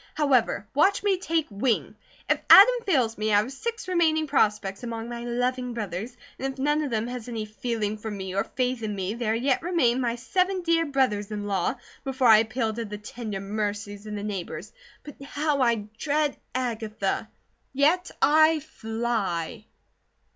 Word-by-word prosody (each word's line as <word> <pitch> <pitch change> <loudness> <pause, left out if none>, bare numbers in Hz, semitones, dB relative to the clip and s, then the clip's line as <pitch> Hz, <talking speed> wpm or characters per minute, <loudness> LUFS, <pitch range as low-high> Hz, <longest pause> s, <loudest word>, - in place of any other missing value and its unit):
However, 255 -8 +2
watch 390 +9 +3
me 390 -3 +2
take 330 -4 0
wing! 220 +4 0 0.3
If - - +1
Adam 445 +6 +10
fails 245 - +1
me 215 0 0
I 205 - +5
have 215 +5 +1
six 450 +11 -5
remaining 320 -3 +2
prospects 210 -8 +1
among 230 -1 -5
my 235 0 -5
loving 245 0 -1
brothers, 215 +3 -5 0.2
and 270 +1 -2
if 270 - -13
none 295 +3 +1
of 295 - -2
them 225 -2 -1
has 245 -1 -6
any 225 -2 -3
feeling 215 -1 -3
for 220 - -5
me 190 -3 -5
or 195 - +1
faith 255 -2 -2
in 210 -2 -3
me 190 +1 -2
there 225 -2 -1
yet 255 +3 +1
remain 320 -8 +2
my 235 -1 0
seven 365 +9 0
dear 330 -1 +2
brothers 255 -8 0
in 210 -1 -4
law, 195 +3 0 0.3
before 260 -2 +2
I 220 - +9
appeal 220 0 -1
to 230 +1 -4
the 210 0 -6
tender 210 -1 -6
mercies 205 0 -4
of 210 - -5
the 205 - -5
neighbours; 200 -4 -5 0.3
but 295 -2 -12
how 290 0 -1
I 235 -4 +2
dread 295 -1 +1 0.2
Agatha! 220 -4 -2 0.4
Yet 310 +7 +2
I 315 +1 +5
fly!" 220 -5 -3
235 Hz, 175 wpm, -26 LUFS, 210-280 Hz, 0.4 s, Adam